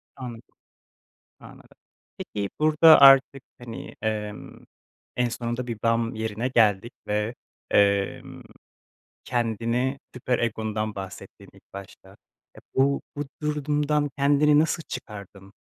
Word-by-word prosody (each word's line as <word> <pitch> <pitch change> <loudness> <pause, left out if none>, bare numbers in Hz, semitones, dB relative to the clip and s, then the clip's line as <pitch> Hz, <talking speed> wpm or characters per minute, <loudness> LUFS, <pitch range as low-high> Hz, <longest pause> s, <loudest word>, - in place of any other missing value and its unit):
Anladım. 120 -3 -10 0.8
Anladım. - - -16 0.4
Peki, 100 -2 -5
burada 155 +1 +6
artık, 135 0 +6 0.2
hani, 120 -2 -9
emm, 105 -1 -4 0.6
en 125 -1 +1
sonunda 120 +1 -4
bir 115 -3 -5
bam 115 0 +1
yerine 110 +2 -3
geldik 115 -2 +2
ve, 105 +3 -1 0.4
emm, 100 -1 +1 0.8
kendini 120 +3 -1
süper 125 0 -1
egondan 110 -2 -2
bahsettin 95 -1 -10
ilk - - -20
başta. 100 -1 -12 0.4
E, - - -12 0.2
bu, 140 +1 +2
bu 145 - -3 0.2
durumdan 150 0 0
kendini 145 +1 +4
nasıl 160 +1 0
çıkardın? 100 -4 -9
120 Hz, 105 wpm, -25 LUFS, 105-140 Hz, 0.8 s, burada